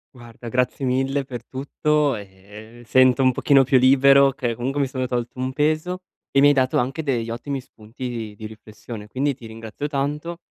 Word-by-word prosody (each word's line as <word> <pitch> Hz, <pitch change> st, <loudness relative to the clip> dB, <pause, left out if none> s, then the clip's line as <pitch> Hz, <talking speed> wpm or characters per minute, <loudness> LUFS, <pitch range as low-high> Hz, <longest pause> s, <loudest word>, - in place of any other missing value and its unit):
Guarda, 120 Hz, -1 st, -12 dB
grazie 125 Hz, +3 st, -1 dB
mille 135 Hz, +2 st, 0 dB
per 120 Hz, -3 st, -8 dB
tutto. 145 Hz, +1 st, 0 dB
Ehm, 105 Hz, +4 st, -12 dB
sento 130 Hz, +2 st, +4 dB
un 130 Hz, -1 st, +4 dB
pochino 135 Hz, 0 st, +4 dB
più 135 Hz, +1 st, +4 dB
libero 135 Hz, +1 st, +6 dB
che 125 Hz, -4 st, -3 dB
comunque 130 Hz, +4 st, -3 dB
mi 140 Hz, -, +1 dB
sono 130 Hz, -1 st, -3 dB
tolto 120 Hz, 0 st, -3 dB
un 130 Hz, +1 st, -2 dB
peso 155 Hz, +6 st, -1 dB, 0.3 s
e 140 Hz, -, +3 dB
mi 145 Hz, -, +7 dB
hai 145 Hz, -, +6 dB
dato 130 Hz, -2 st, +1 dB
anche 135 Hz, +6 st, -1 dB
degli 120 Hz, -6 st, -1 dB
ottimi 135 Hz, +4 st, -4 dB
spunti 120 Hz, +1 st, -9 dB
di 115 Hz, -3 st, -5 dB
di 110 Hz, -, -8 dB
riflessione, 110 Hz, 0 st, -10 dB
quindi 135 Hz, +5 st, -1 dB
ti 120 Hz, -, -14 dB
ringrazio 110 Hz, +5 st, -6 dB
tanto 150 Hz, +4 st, -3 dB
130 Hz, 190 wpm, -22 LUFS, 115-140 Hz, 0.3 s, mi